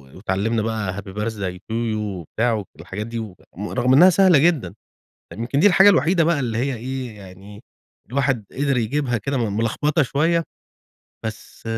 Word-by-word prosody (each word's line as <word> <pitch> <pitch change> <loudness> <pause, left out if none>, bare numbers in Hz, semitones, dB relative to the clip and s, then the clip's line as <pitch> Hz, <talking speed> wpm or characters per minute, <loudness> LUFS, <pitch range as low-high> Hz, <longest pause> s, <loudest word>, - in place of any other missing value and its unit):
وتعلمنا 105 +4 -1
بقى 105 -4 -2
happy 100 -1 -8
birthday 105 -4 -3
to 100 +4 -10
you 115 -1 -1
وبتاع 105 +3 -2
والحاجات 95 +6 -6
دي 115 0 -4
و 105 -5 -7 0.2
رغم 125 +5 0
إنها 175 +7 +8
سهلة 185 -3 +5
جدًا، 145 - +1 0.6
يمكن 120 +6 -2
دي 205 - +5
الحاجة 195 0 +7
الوحيدة 170 -1 +4
بقى 165 -3 +1
اللي 115 -3 -2
هي 135 +1 -1
إيه 125 -1 -5
يعني 100 +2 -13 0.5
الواحد 135 -4 0
قدر 140 0 0
يجيبها 120 +1 0
كده 135 +6 -3
م 105 -4 -1
ملخبطة 145 +8 +1
شوية. 165 +6 +1 0.8
بس 110 0 -8
115 Hz, 160 wpm, -21 LUFS, 105-140 Hz, 0.8 s, إنها